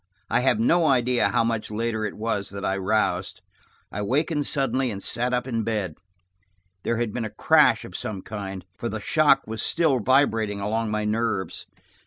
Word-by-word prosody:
I - - +3
have 135 +12 +2
no 175 -8 +3
idea 125 -2 +3
how - - +2
much 115 -1 -2
later 110 0 -2
it - - -4
was 105 -2 -2
that 100 0 -6
I 95 - +1
roused. 100 +3 0 0.5
I 105 - -4
wakened 145 +7 0
suddenly 135 -2 0
and 105 - -4
sat 120 +2 0
up 125 0 0
in 115 -3 -1
bed. 105 -6 -2 0.9
There 115 +5 -1
had 115 -3 -2
been 120 - -2
a 110 - -3
crash - - +3
of - - -10
some 100 -3 -4
kind, 95 -4 -6
for - - -2
the - - -4
shock - - +3
was 110 0 -4
still 160 -6 +2
vibrating 115 -4 +2
along 110 +2 -1
my 105 0 -1
nerves. 110 -4 -2
115 Hz, 185 wpm, -25 LUFS, 105-125 Hz, 0.9 s, I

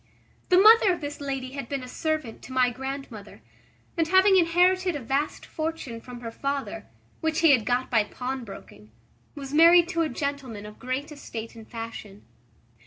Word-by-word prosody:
The 365 - +5
mother 430 +1 +7
of 350 - -2
this 290 -1 -6
lady 270 -2 -4
had 275 -3 -7
been 275 -2 -3
a - - -8
servant 310 -3 -3
to - - -12
my 255 -1 +2
grand 270 +2 -6
mother; 210 -2 -12 0.5
and, 330 -2 +1
having 380 +3 +5
inherited 360 +1 +3
a - - -3
vast 275 +4 -2
fortune 310 -8 -5
from 245 0 -10
her 230 -1 -6
father, 275 +3 -4 0.3
which 320 -1 -1
he 325 -3 +6
had 250 -6 +3
got 250 +1 0
by 225 -3 +4
pawnbroking, 230 - -7 0.5
was 275 -1 -8
married 335 +2 +7
to 335 -1 0
a 320 - 0
gentleman 275 -9 -4
of 210 0 -12
great 260 +4 -4
estate 230 -6 -8
and 225 -1 -13
fashion. 225 -3 -8
275 Hz, 175 wpm, -26 LUFS, 240-325 Hz, 0.5 s, mother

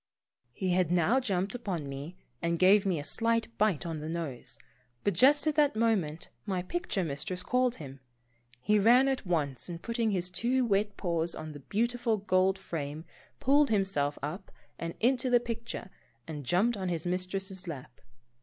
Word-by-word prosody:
He 185 +10 -3
had 180 -2 +2
now 180 +9 +3
jumped 195 -6 -1
upon 190 - -3
me 140 +6 -7 0.2
and 170 0 0
gave 195 +3 +5
me 180 -5 +1
a - - -5
slight 230 +5 0
bite 200 -6 +2
on 165 -2 -3
the 155 +1 -5
nose, 160 -7 -5 0.5
but 200 - +2
just 275 - +5
at 310 - +2
that 290 -4 +3
moment 200 -9 0
my 185 -4 -2
picture 280 - -2
mistress 165 +4 -4
called 250 -1 +1
him. 140 -4 -9 0.6
He 210 +11 +2
ran 245 +6 +6
at 265 -7 -1
once, 145 -5 -1
and 170 -1 -5
putting 230 +4 -1
his 180 -3 -1
two 250 +5 +1
wet 205 -1 0
paws 170 -2 -1
on 155 0 -6
the 145 - -9
beautiful 230 - 0
gold 190 -1 +2
frame 155 -4 -5 0.3
pulled 285 +2 +4
himself 190 -9 +1
up 175 +7 -5 0.3
and 165 0 -4
into 255 +2 +2
the 245 -1 +5
picture 230 -4 -6 0.4
and 150 -5 -6
jumped 210 - +3
on 190 -2 -3
his 165 -2 -2
mistress's 185 +1 -3
lap. 130 -6 -8
190 Hz, 175 wpm, -30 LUFS, 165-230 Hz, 0.6 s, ran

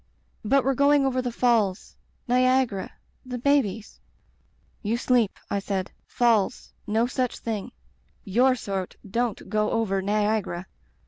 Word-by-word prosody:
'But 270 +5 +3
we're 270 - +2
going 280 +1 +4
over 260 -1 +1
the 250 -1 -3
falls 225 -5 +1 0.2
— - - -42
^Niagara 255 -4 +2 0.2
— - - -41
the 250 - -2
babies 235 -5 0 0.4
' - - -39
"'You 225 +1 -1
sleep,' 240 -4 +1
I 200 - +1
said. 195 -1 -3 0.2
'Falls 230 -5 +1
— - - -40
^no 220 +3 +2
such 250 -1 -2
thing. 225 +1 -4 0.5
Tour 250 +6 +3
sort 195 -6 -4
don't 230 +2 -2
go 215 -1 +1
over 200 -4 0
Niagara.' 205 -3 0
230 Hz, 145 wpm, -25 LUFS, 205-250 Hz, 0.5 s, going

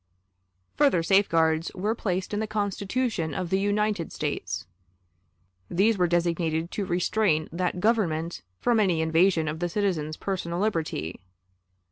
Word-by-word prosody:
Further 275 - +4
safeguards 165 -4 +3
were 205 +4 0
placed 190 -3 -2
in 205 - 0
the 220 - -1
Constitution 205 - -1
of 180 -2 -3
the 190 - +3
United 205 -3 0
States. 100 -11 -3 1.0
These 210 +6 +3
were 180 -2 +2
designed 170 -1 0
to 205 - -2
restrain 175 -2 +1
that 180 +1 -1
Government 170 - 0 0.2
from 235 -2 +2
any 180 -6 +2
invasion 165 0 +3
of 155 +1 -3
the 175 0 -1
citizen's 165 -6 -1
personal 175 -3 -3
liberty. 165 - -2
180 Hz, 130 wpm, -26 LUFS, 160-205 Hz, 1.0 s, Further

